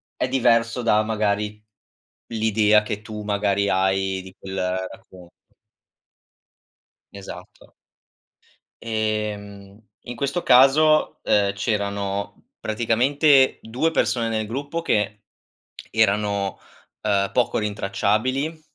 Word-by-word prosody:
è 125 - -1
diverso 120 -2 +2
da, 110 -2 +3
magari, 105 -1 -1 0.7
l'idea 110 -1 +3
che 105 0 -4
tu, 105 -1 -7
magari, 100 -1 0
hai 95 0 0
di 95 0 -13
quel 95 0 -7 0.3
racconto 90 -2 -15 1.8
Esatto. 100 -1 -11 1.1
Ehm, 105 -2 -4 0.3
in 120 - -6
questo 140 +7 -2
caso, 150 +5 +4
uhm, 100 -1 +2
c'erano 100 -2 -3
praticamente 130 +6 +3
2 130 +9 -1
persone 120 -7 +1
nel 110 -1 -2
gruppo 140 +8 -4
che 105 -7 -1 0.7
erano, 100 -2 +1 0.4
uhm, 100 -2 +1
poco 125 -2 +1
rintracciabili, 110 +9 -1
105 Hz, 95 wpm, -23 LUFS, 100-120 Hz, 1.8 s, caso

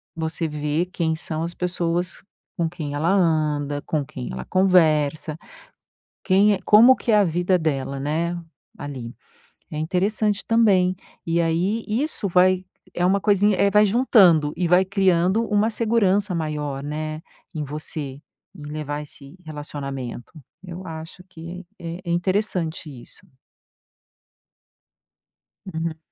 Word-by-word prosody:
você 160 0 -2
vê 150 +3 -1
quem 160 -3 -1
são 160 0 -4
as 170 +1 -4
pessoas 175 0 -2 0.4
com 170 -2 +1
quem 155 -4 -6
ela 155 +4 0
anda, 150 -5 +1
com 150 -3 -1
quem 125 -2 -7
ela - - -5
conversa, 155 -5 +2 0.9
quem 205 +2 +4
é 190 - -2
como 235 +5 +7
que 235 - -2
é 210 - +5
a 205 - +5
vida 180 +2 +1
dela, 140 -3 -2
né, 165 +5 -1 0.4
ali. 130 -5 -7 0.6
É 150 - -5
interessante 200 +5 0
também. 195 -6 +3 0.3
E 170 +1 +1
aí, 175 +7 0
isso 235 -1 -1
vai 185 +1 +4 0.3
é 175 - 0
uma 195 +2 +2
coisinha 205 0 +3
eh, 200 - +4
vai 210 +1 +5
juntando 195 - +4
e 180 - 0
vai 180 +2 +5
criando 190 +2 +2
uma 210 +1 +2
segurança 205 -4 +2
maior, 150 -4 -3
né, 155 +1 -4 0.3
em 155 - -3
você, 145 -1 -5 0.4
em 150 - -11
levar 150 -1 -4
esse 150 +1 -13
relacionamento. 140 -5 -6 0.3
Eu 180 +1 -8
acho 160 +3 -8
que 175 +1 -9
é 170 +1 -6
é - - -1
interessante 175 -2 -1
isso. - - -14 2.4
Uhum. 160 -3 -4
170 Hz, 135 wpm, -23 LUFS, 155-190 Hz, 2.4 s, como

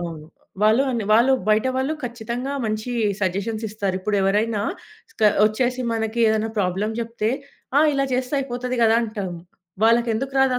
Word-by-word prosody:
అవును. 165 -3 -6 0.4
వాళ్ళు 220 +5 +5
అన్ 235 -3 -1
వాళ్ళు 235 +5 +5 0.2
బయట 215 +3 +3
వాళ్ళు 265 +3 0
ఖచ్చితంగా 240 +3 -4
మంచీ 215 +2 -2 0.3
సజెషన్సిస్తారు. 205 +1 -2
ఇప్పుడెవరైనా 205 +2 +1 0.5
స్క - - -7 0.2
ఒచ్చేసి, 250 +4 -1
మనకి 225 0 -2
ఏదన్నా 220 0 0
ప్రాబ్లమ్ 200 +3 0
జెప్తే, 230 -1 -2 0.5
ఆ! - - +6
ఇలా 275 -1 +1
చేస్తే 255 +2 -1
అయిపోతది 250 -1 -3
గదా! 225 0 +5
అంటాం. 210 -4 -4 0.5
వాళ్ళకెందుకు 235 +3 +2
రాదు 265 -1 +3
225 Hz, 135 wpm, -22 LUFS, 215-245 Hz, 0.5 s, ఆ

